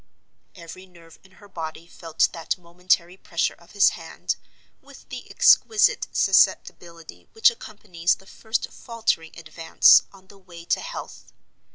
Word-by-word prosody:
Every 185 +1 -12
nerve 170 -2 -19
in 190 0 -22
her 205 +3 -18
body 165 -3 -8
felt 165 -2 -1
that 165 -2 -4
momentary 180 +1 -2
pressure 170 -3 -2
of 170 - -21
his 200 -1 +5
hand, - - -5 0.5
with - - -17
the - - -9
exquisite 450 +3 +3
susceptibility 165 - 0
which 225 - +4
accompanies 185 -6 -3
the 195 - -21
first 220 +3 -4
faltering 220 -9 -3
advance 165 0 +4
on 190 -1 -19
the 195 +1 -19
way 175 -3 -14
to - - -1
health. - - -9
175 Hz, 140 wpm, -23 LUFS, 165-195 Hz, 0.5 s, his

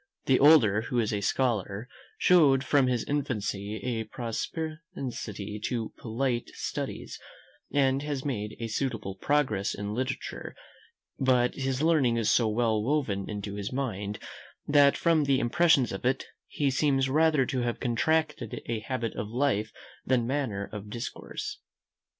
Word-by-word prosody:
The 130 - +4
older, 125 -9 +6
who 120 +2 -3
is 110 -2 +1
a 100 - -1
scholar, 105 -1 0 0.3
showed 145 -7 +5
from 140 -3 +3
his 125 -3 +1
infancy 105 -7 -2
a 115 -3 -1
propensity 120 -4 -5
to 115 -3 -2
polite 120 +1 -2
studies, - - -5 0.5
and 135 -1 +2
has 145 -2 -3
made 105 -6 -3
a 115 - -3
suitable 115 -3 -2
progress 110 -2 0
in 105 +1 -4
literature; 130 +4 -4 0.6
but 125 -2 +3
his 135 +1 -2
learning 145 -8 +3
is 115 -2 +2
so 115 - +4
well 110 0 +1
woven 110 -6 -1
into 100 -1 -4
his 100 0 -4
mind, 105 -6 -3 0.5
that 145 -1 +5
from 165 -3 +3
the 135 -1 +3
impressions 140 0 +3
of 95 - -5
it, 130 +2 +1 0.2
he 140 -2 0
seems 135 -1 +2
rather 155 0 +3
to 130 -1 -2
have 120 -1 -2
contracted 155 +6 0
a 115 -1 -2
habit 115 0 -3
of 105 - -4
life 115 -3 0 0.3
than 125 -2 +2
manner 120 -7 -2
of 105 0 -7
discourse. 135 - -6
125 Hz, 145 wpm, -28 LUFS, 110-140 Hz, 0.6 s, older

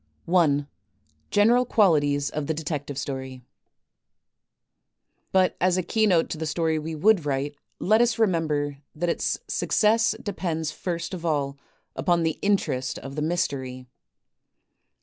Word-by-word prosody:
I. 155 -5 +3 0.6
General 230 +5 +4
Qualities 145 - +2
of 150 -1 -3
the 160 - -1
Detective 145 -3 -4
Story 130 -2 -5 1.9
But 185 -1 +3
as 185 0 +3
a 185 - 0
keynote 190 -3 +2
to 155 - -4
the 160 - -2
story 160 +1 0
we 160 +1 -5
would 195 +2 +4
write 145 0 -2 0.2
let 215 +4 +3
us 240 -1 +2
re 225 - +5
member 150 -6 -1 0.2
that 175 +3 -1
its - - 0
success 220 +1 +2
depends 165 -6 -3
first 170 +2 -4
of 175 -2 -6
all 145 -4 0 0.4
upon 170 +5 +1
the 160 -1 -1
interest 145 -9 0
of 135 +1 -8
the 150 - -2
mystery. 140 -6 -2
160 Hz, 135 wpm, -25 LUFS, 145-185 Hz, 1.9 s, re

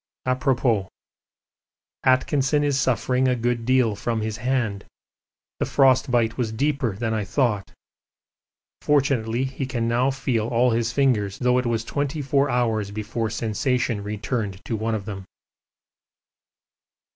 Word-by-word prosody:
Apropos. 130 -5 +1 1.2
Atkinson 135 +2 +2
is 140 -2 +1
suffering 130 +1 +1
a 125 - +2
good 120 -1 -1
deal 130 -5 +3
from 115 +2 -2
his 110 0 -3
hand: 115 -4 -1 0.8
the - - +1
frostbite 125 -4 +3
was 115 -3 0
deeper 135 -2 0
than 110 +2 -2
I 110 -1 -1
thought; 105 -3 0 1.1
fortunately 130 -5 +1
he 135 0 -4
can 120 -3 -2
now 120 +3 +2
feel 130 -5 -1
all 120 +1 +2
his 115 0 0
fingers, 115 -7 +1
though 125 0 +2
it 125 - -2
was 115 -1 -1
twenty 145 +2 -2
four 140 +1 +2
hours 115 -4 0
before 110 +2 -3
sensation 115 +1 -1
returned 105 -1 -3
to 115 - -2
one 110 +1 -1
of 100 -3 -5
them. 100 -3 -6
120 Hz, 135 wpm, -24 LUFS, 110-130 Hz, 1.2 s, deal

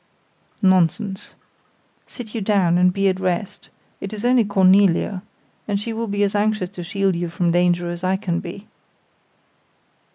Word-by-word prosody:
"Nonsense. 190 +2 +1 0.7
Sit 225 -4 -10
you 225 - -3
down, 190 -4 +2
and 180 0 +4
be 195 +1 0
at 190 -1 0
rest, 185 +1 -3 0.3
it 195 - -6
is 215 +2 -5
only 250 -1 +4
Cornelia; 195 -1 +3 0.5
and 200 -1 -1
she 225 +2 -5
will 230 +1 -3
be 205 0 0
as 200 - 0
anxious 210 -3 0
to 180 - -9
shield 195 0 -1
you 170 0 -3
from 170 +1 0
danger 175 0 +1
as 175 +1 -7
I 185 +1 +1
can 175 -4 -2
be." 195 +4 -9
190 Hz, 160 wpm, -21 LUFS, 180-205 Hz, 0.7 s, and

